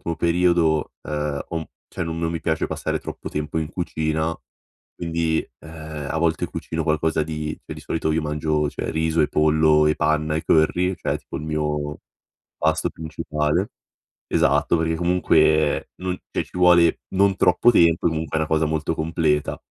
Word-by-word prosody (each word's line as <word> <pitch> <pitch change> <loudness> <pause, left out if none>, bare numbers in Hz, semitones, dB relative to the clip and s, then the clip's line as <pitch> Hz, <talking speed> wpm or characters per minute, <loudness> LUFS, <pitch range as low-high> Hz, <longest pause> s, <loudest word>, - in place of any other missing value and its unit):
ultimo 85 - -3
periodo, 85 -2 +2 0.2
uhm, 75 -1 -2
ho 85 - -4
un 80 - -3
p - - -25 0.2
cioè 90 - -3
non 80 0 -4
mi 85 -1 -3
piace 80 0 -1
passare - - -2
troppo - - -7
tempo 75 +1 -3
in 80 -1 -2
cucina 80 -2 -1 0.6
quindi, 80 -1 -1 0.2
uhm, 80 -2 -8
a - - -1
volte 80 0 +1
cucino 80 0 -4
qualcosa 80 0 +1
di 75 0 -4
cioè - - -6
di - - -10
solito 80 -1 -1
io 80 - 0
mangio 75 0 0
cioè - - -4
riso 80 +1 +1
e - - +3
pollo 75 0 +4
e 75 - +2
panna 75 0 +1
e 80 - -2
curry, 90 +4 +2
cioè - - -2
tipo - - -9
il - - -5
mio 75 -1 -2 0.6
pasto 80 +1 +1
principale. 75 -1 -2 0.6
Esatto 85 - +3
perché 80 0 0
comunque, 80 -3 +2
non 90 0 -3
cioè - - -2
ci - - -23
vuole 90 -2 +5
non 100 0 +4
troppo 90 +7 +4
tempo, 85 -6 +4
comunque 80 -1 -2
è 80 - +1
una 80 - 0
cosa 80 0 +2
molto 80 +1 -1
completa. 80 -2 0
80 Hz, 175 wpm, -23 LUFS, 75-85 Hz, 0.6 s, vuole